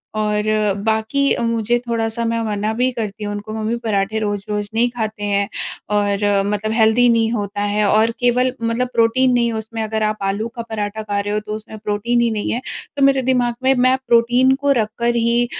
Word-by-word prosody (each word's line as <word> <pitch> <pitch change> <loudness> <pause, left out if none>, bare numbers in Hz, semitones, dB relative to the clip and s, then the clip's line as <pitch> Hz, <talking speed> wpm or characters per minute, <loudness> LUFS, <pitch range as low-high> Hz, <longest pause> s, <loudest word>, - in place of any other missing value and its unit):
और 210 -1 0 0.4
बाकी 220 +5 0 0.2
मुझे 230 +1 +1
थोड़ा 230 -1 0
सा 235 +1 -3
मैं 230 0 0
मना 210 0 -1
भी 250 +3 +1
करती 215 -3 -5
हूँ 205 0 -3
उनको 210 +1 -6
मम्मी 220 +1 -2
पराठे 210 0 0
रोज़-रोज़ 205 0 -3
नहीं 240 +2 +2
खाते 220 -3 -4
हैं 200 0 +1 0.5
और 205 -1 +1 0.3
मतलब 215 +1 -2
हेल्दी 225 +2 +4
नहीं 230 -1 +2
होता 205 -2 -3
है 205 +1 0
और 220 +2 +3
केवल 250 +1 +2
मतलब 230 +2 0
प्रोटीन 240 +3 +3
नहीं 235 -1 +2
उसमें 220 +1 -5
अगर 220 0 -2
आप 215 0 0
आलू 215 +3 -2
का 235 - -4
पराठा 215 0 -3
खा 205 -1 -2
रहे 205 +1 -2
हो 210 - +1
तो 210 0 -7
उसमें 215 0 -9
प्रोटीन 215 +3 0
ही 235 -1 +2
नहीं 210 -1 -2
है। 240 - -2 0.4
तो 280 - -1
मेरे 270 -1 +3
दिमाग 240 -2 +1
में 265 +1 +4
मैं 260 - +4
प्रोटीन 245 +3 +4
को 285 0 +2
रख 215 - -2
कर 235 0 +1
ही 235 +1 +2
220 Hz, 205 wpm, -19 LUFS, 210-235 Hz, 0.5 s, हेल्दी